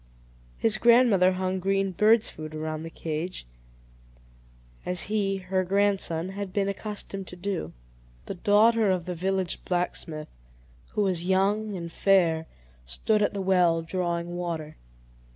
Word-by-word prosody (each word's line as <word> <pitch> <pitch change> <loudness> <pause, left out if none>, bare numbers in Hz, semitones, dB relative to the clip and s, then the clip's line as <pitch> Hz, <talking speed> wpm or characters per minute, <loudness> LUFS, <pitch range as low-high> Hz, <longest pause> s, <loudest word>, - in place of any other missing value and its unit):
His 215 -1 +1
grandmother 230 -6 +5
hung 185 0 -2
green 195 +1 0
birds' 215 +5 +4
food 155 0 -8
around 155 0 -4
the 165 - -6
cage, 165 - -4 1.4
as 180 -1 -1
he, 200 -2 0
her 185 0 -1
grandson, 190 -3 0
had 195 0 -5
been 195 0 0
accustomed 200 -1 -4
to - - -7
do. 180 - -3 0.5
The - - -4
daughter 210 +3 +4
of 180 -3 0
the 180 - -3
village 190 +1 -2
blacksmith, 170 -3 -2 0.6
who 210 - +1
was 180 -3 0
young 200 +2 +1
and 170 -1 -6
fair, 165 -4 +2 0.4
stood 210 - 0
at 205 - +1
the 200 - -2
well, 175 -3 +3
drawing 175 0 -2
water. 165 -3 -4
185 Hz, 135 wpm, -27 LUFS, 170-200 Hz, 1.4 s, grandmother